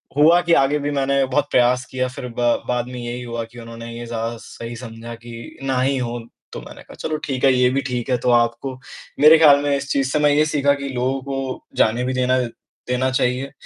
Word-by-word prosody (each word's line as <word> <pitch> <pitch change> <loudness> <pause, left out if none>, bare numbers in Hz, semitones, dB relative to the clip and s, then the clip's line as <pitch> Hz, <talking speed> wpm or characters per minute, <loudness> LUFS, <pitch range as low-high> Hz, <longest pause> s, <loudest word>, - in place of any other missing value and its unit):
हुआ 165 +4 +6
कि 170 -1 +1
आगे 140 +2 +2
भी 145 +1 -2
मैंने 140 -1 +1
बहुत 145 +2 0
प्रयास 125 +1 +3
किया। 130 0 -1
फिर 125 0 -7
ब - - -1 0.3
बाद 125 -1 0
में 125 -1 -7
यही 120 +1 -5
हुआ 115 -1 -4
कि 120 +1 -14
उन्होंने 115 0 -9
ये 120 - -6
ज़्यादा 115 0 -3
सही 115 +1 -8
समझा 115 -1 -8
कि 115 0 -11
ना 135 -2 0
ही 135 +1 +1
हो। 120 -1 -3 0.3
तो - - -6
मैंने - - -12
कहा - - -14
चलो 155 -1 -2
ठीक 135 -2 -3
है, 135 - +6
ये 125 0 +3
भी 135 +2 0
ठीक 125 0 -3
है 125 - +2
तो 125 +1 -1
आपको 120 +2 +1 0.5
मेरे 155 +2 +8
ख्याल 145 -3 +7
में 145 -1 +1
इस 140 0 -4
चीज़ 135 -1 0
से 150 - +1
मैं 150 0 +4
ये 150 +2 +3
सीखा 140 -2 +2
कि 140 -1 -5
लोगों 130 +1 -1
को 135 -1 -5
जाने 115 +3 +2
भी 130 +1 -1
देना 130 0 +2 0.5
देना 125 +1 +1
चाहिए, 130 +1 0
130 Hz, 235 wpm, -21 LUFS, 120-140 Hz, 0.5 s, मेरे